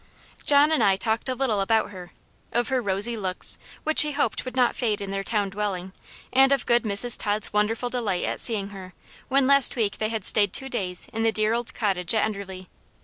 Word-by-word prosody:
John 290 Hz, +1 st, +5 dB
and 315 Hz, -, +1 dB
I 195 Hz, -1 st, +3 dB
talked 220 Hz, +4 st, -2 dB
a 255 Hz, -, -2 dB
little 235 Hz, -6 st, -1 dB
about 220 Hz, +1 st, 0 dB
her 180 Hz, -3 st, -11 dB, 0.4 s
of 240 Hz, -1 st, -1 dB
her 260 Hz, -1 st, 0 dB
rosy 205 Hz, +3 st, +1 dB
looks, 185 Hz, -4 st, -1 dB, 0.2 s
which 315 Hz, 0 st, +5 dB
he 300 Hz, -1 st, +1 dB
hoped 285 Hz, -, -2 dB
would 255 Hz, -, -7 dB
not 250 Hz, -2 st, +1 dB
fade 220 Hz, -5 st, -2 dB
in 200 Hz, -1 st, -6 dB
their 195 Hz, 0 st, -4 dB
town 205 Hz, -2 st, -2 dB
dwelling 190 Hz, -2 st, -5 dB, 0.4 s
and 270 Hz, +1 st, +4 dB
of 275 Hz, -3 st, 0 dB
good 240 Hz, 0 st, +1 dB
Mrs. 215 Hz, +3 st, +5 dB
Tod's 210 Hz, 0 st, -3 dB
wonderful 225 Hz, +4 st, -1 dB
delight 210 Hz, -8 st, -2 dB
at -, -, -2 dB
seeing 205 Hz, -4 st, +3 dB
her, 190 Hz, -3 st, -12 dB, 0.3 s
when 275 Hz, 0 st, +1 dB
last 275 Hz, -1 st, +4 dB
week 210 Hz, -4 st, -2 dB
they 215 Hz, -, -2 dB
had 220 Hz, -3 st, -5 dB
stayed 205 Hz, -2 st, +3 dB
two 270 Hz, -1 st, 0 dB
days 185 Hz, -8 st, -1 dB
in 225 Hz, -, -4 dB
the 225 Hz, 0 st, +1 dB
dear 215 Hz, 0 st, 0 dB
old 235 Hz, 0 st, -4 dB
cottage 190 Hz, -3 st, -1 dB
at 220 Hz, -, +1 dB
Enderley. 195 Hz, -3 st, -8 dB
215 Hz, 215 wpm, -24 LUFS, 195-245 Hz, 0.4 s, John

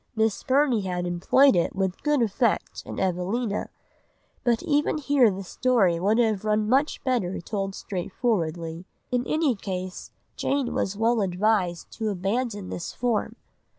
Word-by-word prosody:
Miss 220 Hz, -2 st, +1 dB
Burney 265 Hz, -4 st, +2 dB
had 180 Hz, -2 st, -2 dB
employed 185 Hz, +9 st, +4 dB
it 175 Hz, -, +1 dB
with 190 Hz, -1 st, -1 dB
good 295 Hz, -4 st, +2 dB
effect 225 Hz, +1 st, 0 dB
in -, -, -5 dB
Evelina, 195 Hz, +4 st, -1 dB, 0.7 s
but 235 Hz, -2 st, +1 dB
even 295 Hz, +1 st, +1 dB
here 280 Hz, -5 st, +4 dB
the 195 Hz, 0 st, -4 dB
story 195 Hz, -5 st, +2 dB
would 205 Hz, +5 st, +2 dB
have 220 Hz, -4 st, +2 dB
run 215 Hz, 0 st, +1 dB
much 270 Hz, +6 st, +1 dB
better 240 Hz, -9 st, 0 dB
told 195 Hz, +1 st, -3 dB
straightforwardly. 175 Hz, -4 st, -2 dB, 0.3 s
In 245 Hz, -1 st, +1 dB
any 310 Hz, -4 st, +2 dB
case 185 Hz, -2 st, -5 dB, 0.3 s
Jane 275 Hz, -3 st, -1 dB
was 200 Hz, +1 st, -1 dB
well 225 Hz, +1 st, +2 dB
advised 185 Hz, -2 st, 0 dB
to 220 Hz, -1 st, 0 dB
abandon 205 Hz, +1 st, -2 dB
this 175 Hz, -, -5 dB
form. 235 Hz, -3 st, -1 dB
210 Hz, 145 wpm, -25 LUFS, 185-245 Hz, 0.7 s, employed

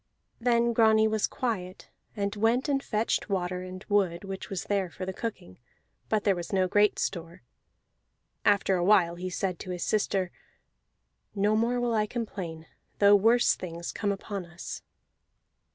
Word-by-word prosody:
Then 235 Hz, 0 st, +2 dB
Grani 220 Hz, -1 st, +5 dB
was 215 Hz, -1 st, +1 dB
quiet, 190 Hz, -7 st, -4 dB, 0.2 s
and 200 Hz, 0 st, -2 dB
went 225 Hz, +6 st, +2 dB
and 275 Hz, -2 st, +1 dB
fetched 220 Hz, -3 st, -1 dB
water, 180 Hz, -2 st, -1 dB
and 185 Hz, +1 st, -8 dB
wood 190 Hz, -4 st, +1 dB
which 195 Hz, -1 st, -6 dB
was 195 Hz, -2 st, -3 dB
there 195 Hz, -3 st, -1 dB
for 185 Hz, -, -6 dB
the 190 Hz, -, -4 dB
cooking 185 Hz, -, -6 dB, 0.5 s
(but 215 Hz, -2 st, +1 dB
there 200 Hz, -2 st, +3 dB
was 175 Hz, -1 st, -6 dB
no 190 Hz, -2 st, +2 dB
great 205 Hz, +2 st, +3 dB
store). 170 Hz, -5 st, -4 dB, 1.0 s
After 200 Hz, -2 st, +3 dB
a 175 Hz, -, 0 dB
while 180 Hz, -3 st, +4 dB
he 180 Hz, +2 st, -5 dB
said 180 Hz, -1 st, -2 dB
to -, -, -8 dB
his 180 Hz, -1 st, -3 dB
sister, 195 Hz, -4 st, 0 dB, 1.0 s
"No 205 Hz, +2 st, +2 dB
more 235 Hz, +3 st, +1 dB
will 240 Hz, -1 st, 0 dB
I 215 Hz, -1 st, +1 dB
complain, 185 Hz, -9 st, -5 dB, 0.3 s
though 205 Hz, 0 st, +7 dB
worse 230 Hz, +4 st, +4 dB
things 170 Hz, -1 st, -6 dB
come 205 Hz, -2 st, -1 dB
upon 200 Hz, 0 st, -4 dB
us." 175 Hz, +1 st, -8 dB
200 Hz, 160 wpm, -28 LUFS, 180-220 Hz, 1.0 s, though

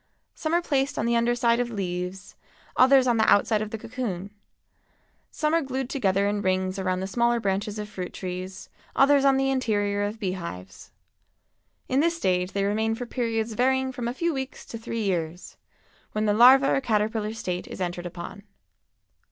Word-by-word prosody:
Some 315 Hz, +1 st, -1 dB
are 345 Hz, -, +2 dB
placed 275 Hz, -2 st, 0 dB
on -, -, 0 dB
the 235 Hz, 0 st, +2 dB
under 235 Hz, +1 st, +2 dB
side 235 Hz, 0 st, +2 dB
of 245 Hz, -1 st, 0 dB
leaves, 185 Hz, -2 st, -4 dB, 0.4 s
others 265 Hz, 0 st, +6 dB
on 240 Hz, -2 st, +2 dB
the 220 Hz, -, +4 dB
outside 210 Hz, +1 st, +3 dB
of 215 Hz, -, -3 dB
the 225 Hz, -, -5 dB
cocoon; 210 Hz, -5 st, -5 dB, 1.0 s
some 305 Hz, 0 st, -1 dB
are 330 Hz, -, +3 dB
glued 265 Hz, -2 st, -3 dB
together 200 Hz, -6 st, +1 dB
in 205 Hz, 0 st, -1 dB
rings 185 Hz, 0 st, 0 dB
around 185 Hz, -1 st, -1 dB
the -, -, -2 dB
smaller 235 Hz, +4 st, +1 dB
branches 205 Hz, +1 st, -2 dB
of 210 Hz, 0 st, -4 dB
fruit 185 Hz, -4 st, -6 dB
trees, 185 Hz, 0 st, -6 dB, 0.3 s
others 280 Hz, 0 st, +5 dB
on 275 Hz, -1 st, +4 dB
the 270 Hz, 0 st, +1 dB
interior 205 Hz, -6 st, 0 dB
of 205 Hz, +2 st, -2 dB
bee 195 Hz, -4 st, -1 dB
hives. 95 Hz, -, -8 dB, 1.0 s
In 260 Hz, -, +1 dB
this 335 Hz, +2 st, +2 dB
stage 180 Hz, -, 0 dB
they 200 Hz, -, 0 dB
remain 220 Hz, +2 st, 0 dB
for 245 Hz, +2 st, -5 dB
periods 230 Hz, -2 st, -2 dB
varying 260 Hz, +2 st, +1 dB
from 245 Hz, -2 st, -4 dB
a 240 Hz, -, -2 dB
few 335 Hz, +3 st, 0 dB
weeks 265 Hz, -1 st, -5 dB
to 230 Hz, -, -7 dB
three 225 Hz, 0 st, -4 dB
years, 175 Hz, -3 st, -3 dB, 0.6 s
when 215 Hz, 0 st, 0 dB
the 205 Hz, -, +3 dB
larva 260 Hz, +5 st, +7 dB
or 270 Hz, -, +1 dB
caterpillar 215 Hz, -2 st, 0 dB
state 180 Hz, -5 st, -4 dB
is -, -, -8 dB
entered 175 Hz, -1 st, -3 dB
upon. 175 Hz, +3 st, -8 dB
220 Hz, 185 wpm, -26 LUFS, 190-255 Hz, 1.0 s, larva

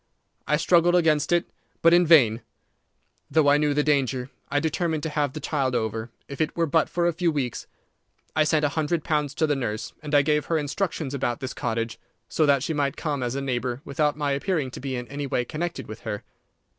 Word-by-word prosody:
I 150 Hz, -, +3 dB
struggled 175 Hz, +2 st, +4 dB
against 160 Hz, -4 st, +2 dB
it, 175 Hz, -1 st, +3 dB, 0.4 s
but 165 Hz, +1 st, +7 dB
in 175 Hz, -1 st, +5 dB
vain. 120 Hz, -9 st, +6 dB, 0.9 s
Though 155 Hz, -2 st, +3 dB
I 145 Hz, -, +5 dB
knew 150 Hz, -1 st, +1 dB
the 150 Hz, -, +2 dB
danger, 135 Hz, -3 st, 0 dB, 0.2 s
I 145 Hz, -, +1 dB
determined 160 Hz, 0 st, -1 dB
to 160 Hz, -, -1 dB
have 145 Hz, -3 st, -1 dB
the 155 Hz, -, -5 dB
child 135 Hz, -4 st, -1 dB
over, 110 Hz, 0 st, -2 dB, 0.2 s
if 140 Hz, +2 st, -5 dB
it 155 Hz, -, -1 dB
were 170 Hz, -, +3 dB
but 160 Hz, +1 st, +2 dB
for 175 Hz, 0 st, 0 dB
a 175 Hz, -, +2 dB
few 170 Hz, 0 st, +1 dB
weeks. 130 Hz, -6 st, -3 dB, 0.7 s
I 155 Hz, -, +4 dB
sent 150 Hz, 0 st, +2 dB
a -, -, +2 dB
hundred 155 Hz, +2 st, -1 dB
pounds 150 Hz, -2 st, -1 dB
to 160 Hz, -, +2 dB
the 150 Hz, -2 st, +1 dB
nurse, 110 Hz, -5 st, -3 dB
and 150 Hz, -1 st, -2 dB
I 145 Hz, -, +6 dB
gave 150 Hz, 0 st, +1 dB
her 165 Hz, -, +1 dB
instructions 155 Hz, -1 st, -2 dB
about 120 Hz, -3 st, -1 dB
this 130 Hz, -1 st, -5 dB
cottage, 115 Hz, 0 st, -3 dB, 0.3 s
so 155 Hz, -, +1 dB
that 140 Hz, -2 st, +3 dB
she 160 Hz, -, -1 dB
might 140 Hz, -3 st, -1 dB
come 145 Hz, -4 st, -2 dB
as 125 Hz, +1 st, -2 dB
a 140 Hz, -, -2 dB
neighbour, 125 Hz, -1 st, -2 dB
without 150 Hz, +1 st, 0 dB
my 145 Hz, -2 st, 0 dB
appearing 140 Hz, -1 st, -1 dB
to -, -, -8 dB
be 135 Hz, 0 st, -4 dB
in 125 Hz, -1 st, -5 dB
any 140 Hz, +2 st, -4 dB
way 125 Hz, -2 st, 0 dB
connected 170 Hz, +6 st, -4 dB
with 110 Hz, +1 st, -8 dB
her. 105 Hz, -, -5 dB
145 Hz, 220 wpm, -25 LUFS, 130-160 Hz, 0.9 s, but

